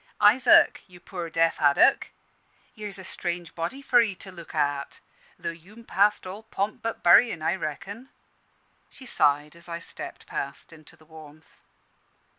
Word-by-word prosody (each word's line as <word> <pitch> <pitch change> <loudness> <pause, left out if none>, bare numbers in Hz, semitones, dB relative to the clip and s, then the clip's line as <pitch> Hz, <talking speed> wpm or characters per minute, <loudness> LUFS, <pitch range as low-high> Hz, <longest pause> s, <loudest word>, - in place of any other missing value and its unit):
Isaac, 240 +5 +5
you 180 -2 -16
poor 175 -2 -7
deaf 165 +1 +1
haddock, 145 -1 +4 0.6
here's 210 -3 -5
a 190 - -9
strange 175 -2 -3
body 175 +12 -5
for 245 -3 +5
'ee 215 -4 -1
to 190 +1 -10
look 170 -3 -12
at; 145 -1 -1 0.4
tho' - - -4
you'm 195 +8 -15
past 205 -1 +2
all 190 +3 -7
pomp 215 -1 -4
but 230 0 -4
buryin', 175 -1 +5
I - - +1
reckon." 195 - -6 0.8
She 265 - -14
sighed 145 - +1
as 170 +1 -14
I 170 - -4
stepped 170 - -7
past 140 +4 -6
into 155 -2 -16
the 155 - -22
warmth. 155 0 -16
175 Hz, 155 wpm, -26 LUFS, 160-210 Hz, 0.8 s, Isaac